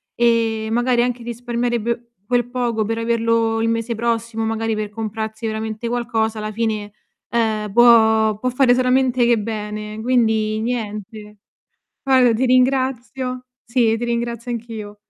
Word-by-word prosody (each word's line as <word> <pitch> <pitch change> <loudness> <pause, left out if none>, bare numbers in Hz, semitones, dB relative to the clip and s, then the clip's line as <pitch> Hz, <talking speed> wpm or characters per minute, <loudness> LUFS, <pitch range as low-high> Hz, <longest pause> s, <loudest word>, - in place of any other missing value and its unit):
e 230 -2 +1
magari 240 +1 +2
anche 245 0 -2
risparmierebbe 235 0 -3
quel 245 +1 0
poco 240 -3 -1
per 225 +2 -2
averlo 230 -1 +1
il 225 - +1
mese 230 +1 -1
prossimo, 230 0 -2
magari 225 0 -1
per 215 -1 -3
comprarsi 220 +1 -5
veramente 220 +1 -3
qualcosa 225 -2 -1
alla 215 0 -4
fine, 215 -2 -2 0.4
ehm, 220 -3 0
può 220 -2 +5
può 255 - 0
fare 250 0 +4
solamente 255 0 +2
che 235 -1 +4
bene 210 0 -5
quindi 220 -3 +1
niente. 215 -2 -5 0.7
Guarda 260 -3 +4
ti 230 +4 0
ringrazio, 255 0 0 0.2
sì 235 -2 +2
ti 235 - -5
ringrazio 235 0 -3
anch'io. 220 -3 -6
230 Hz, 135 wpm, -20 LUFS, 220-240 Hz, 0.7 s, può